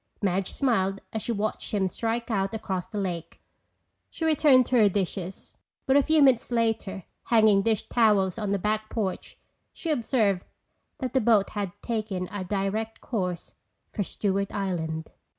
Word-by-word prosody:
Madge 190 -1 0
smiled 195 -7 0
as 220 - -2
she 235 - -2
watched 215 0 -2
him 195 -2 +2
strike 230 +5 -2
out 195 0 0
across 190 -4 -3
the 210 - -7
lake. 180 -4 -4 0.7
She 325 - -4
returned 290 -5 +5
to 255 - +1
her 210 -3 +6
dishes, 190 -1 -3 0.3
but 265 - +3
a 285 - +7
few 310 +1 +4
minutes 260 -4 +4
later, 225 -5 -1 0.2
hanging 215 -4 +5
dish 220 0 0
towels 210 -4 +3
on 210 -2 -2
the 200 - +2
back 215 +2 -1
porch, 205 -5 -3 0.4
she 330 - -3
observed 220 -8 +1 0.5
that 255 -3 -4
the 265 - +3
boat 215 -3 +3
had 200 -3 -3
taken 215 -6 -2
a 205 -1 -4
direct 205 +4 -2
course 180 -7 -3 0.4
for 210 - -3
Stewart 200 0 -1
Island. 160 -5 -3
210 Hz, 160 wpm, -26 LUFS, 190-230 Hz, 0.7 s, a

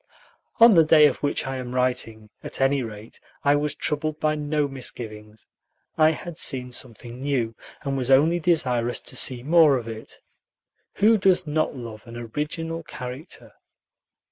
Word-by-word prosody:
On 230 0 +8
the 165 -3 +6
day 155 -1 +6
of 145 - +2
which 145 - -2
I 135 0 -4
am 125 -1 -6
writing, 120 -4 -2
at - - -5
any 135 +1 +2
rate, 110 -1 -9 0.2
I 145 0 +4
was 145 0 -1
troubled 155 +1 -2
by 155 0 +1
no 150 -1 -1
misgivings. 110 -5 -7 0.5
I 155 0 +5
had 160 +1 -5
seen 125 -3 +1
something 120 0 -6
new, 130 -5 -1 0.3
and 140 -1 -2
was 130 -1 -2
only 155 +6 +4
desirous 125 -8 0
to - - -7
see 125 -2 +1
more 155 -2 +5
of 115 -2 -7
it. 110 -1 -9 0.8
Who 215 +2 +4
does 185 -1 +3
not 155 0 -1
love 115 -1 -9
an 115 0 -9
original 150 +7 -4
character? 130 0 -9
135 Hz, 160 wpm, -24 LUFS, 120-155 Hz, 0.8 s, On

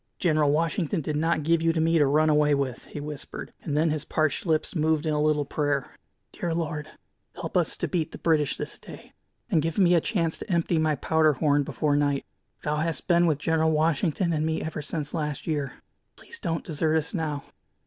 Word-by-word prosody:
"General 155 -5 +2
Washington 165 +3 0
did 150 +1 -3
not 160 0 +1
give 165 +1 +2
you 165 0 +3
to 165 - 0
me 165 +1 +3
to 145 - +4
run 155 +3 +3
away 150 -1 +4
with," 135 -3 -3
he - - -8
whispered; 150 -1 -7
and 150 -2 -2
then 160 +1 +3
his 155 -1 -2
parched 155 +3 0
lips 155 -1 +1
moved 160 0 +1
in 155 - +1
a 150 - +1
little 150 -1 +2
prayer: 145 -2 -1 0.4
"Dear 170 -2 -3
Lord, 155 -2 -3 0.5
help - - -6
us - - +2
to - - -2
beat 165 -4 -1
the - - -8
British 155 -4 +1
this - - -5
day, - - -12 0.4
and 160 - +4
give 165 +1 -2
me 180 -3 +5
a 170 - +4
chance 170 -6 -1
to 215 - -6
empty 170 -1 +2
my 155 -1 +2
powder 155 +2 +3
horn 145 +1 +2
before 145 +1 0
night. 145 -1 +1 0.4
Thou 150 0 0
hast 165 +1 -2
been 175 -1 +4
with 155 -3 +2
General 160 +1 +1
Washington 160 +2 +1
and 155 -1 0
me 160 0 -1
ever 160 -1 -4
since 150 0 -4
last 150 -3 -3
year. 145 -4 -2 0.4
Please 465 - -9
don't 165 0 -2
desert 155 -1 0
us 160 0 -2
now." 155 -5 -2
155 Hz, 210 wpm, -26 LUFS, 150-165 Hz, 0.5 s, me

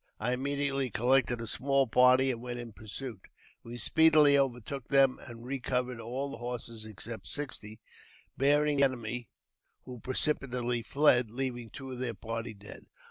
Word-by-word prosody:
II 125 +3 0
immediately 140 0 -1
collected 120 +2 +2
a 115 - -5
small 135 +4 +1
party 125 +2 +5
and 115 -2 -6
went 120 0 -5
in 120 -2 -8
pursuit. 110 +1 -7 0.4
• - - -10
Wl" 120 - -6
speedily 155 +2 +6
overtook 135 -1 -1
them, 135 -2 +4
and 120 -1 -10
recovered 125 -2 -2
all 130 +5 -4
the - - -8
horses 120 -2 -6
except 110 +2 -7
sixty, 115 -7 -5 0.6
bearing 145 +2 +2
the 140 - +4
enemy, 120 -2 -2 0.6
who 125 -2 -9
precipitately 125 -2 0
fled, 125 0 +3
leaving 120 -1 -4
two 135 +2 -9
of 125 - -6
their 120 -3 -3
party 115 +2 -5
dead. 100 +1 -11
125 Hz, 155 wpm, -30 LUFS, 115-135 Hz, 0.6 s, speedily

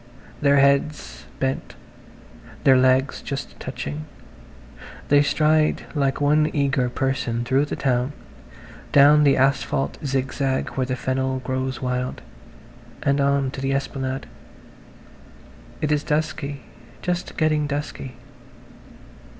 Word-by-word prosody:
Their 140 -1 +4
heads 140 - +1
bent, 135 0 -2 0.9
their 135 - +6
legs 130 +1 +3
just 140 0 -6
touching, 135 +4 -5 1.0
they 145 0 +6
stride 155 +1 +2
like 140 -3 0
one 150 +1 +3
eager 140 -3 +1
person 125 -2 -1
through 135 +3 +2
the - - -4
town, 130 -1 0 0.8
down 145 +2 +7
the 140 - +4
asphalt 135 0 +1
zigzag 135 0 -1
where 130 -1 -2
the 130 - -1
fennel 130 +1 -1
grows 130 0 -3
wild, 125 0 -2 0.8
and 140 0 +2
on 140 -1 +1
to 135 - -7
the 135 0 0
esplanade. 135 -1 -3 1.6
It 150 -1 0
is 150 -1 +1
dusky–just 150 +1 -4
getting 155 -2 +2
dusky. 140 -3 -5
135 Hz, 110 wpm, -23 LUFS, 130-145 Hz, 1.6 s, down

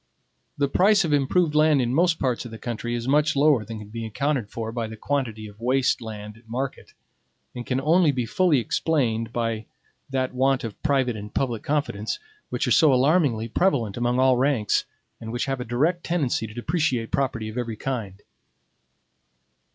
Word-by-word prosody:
The 140 - +2
price 195 +6 +4
of 155 - 0
improved 150 +3 +2
land 150 -1 +4
in 120 -1 0
most 170 +2 +3
parts 125 -3 -1
of 120 - -8
the 110 - -8
country 120 0 -4
is 120 +1 -4
much 150 +2 +3
lower 140 -4 +4
than 115 0 -7
can 105 -1 -10
be 115 +1 -6
accounted 125 +1 -1
for 115 0 -5
by 115 -1 -3
the 110 0 -9
quantity 115 -4 -2
of 105 +1 -15
waste 130 +2 +2
land 105 -1 -8
at 115 0 -21
market, 130 +3 -5 0.6
and 120 -1 -7
can 130 0 0
only 160 +3 +4
be 125 -3 -2
fully 170 +6 +2
explained 115 -2 0
by 115 -2 -2 0.4
that 130 -1 -1
want 130 +1 +2
of 115 -3 -7
private 135 -5 +1
and 105 0 -9
public 120 -5 -1
confidence, 140 -8 -2 0.3
which - - -1
are - - 0
so 155 -4 +6
alarmingly 130 -4 +3
prevalent 120 - +1
among 120 +1 0
all 130 -1 +4
ranks, 125 -5 +1 0.3
and 110 0 -7
which 120 +1 -1
have 135 -2 -2
a - - -4
direct 155 +9 0
tendency 140 -10 0
to 105 - -11
depreciate 125 -3 -1
property 130 -5 -1
of 110 - -7
every 115 -2 -3
kind. 105 -7 -4
125 Hz, 185 wpm, -24 LUFS, 115-145 Hz, 0.6 s, so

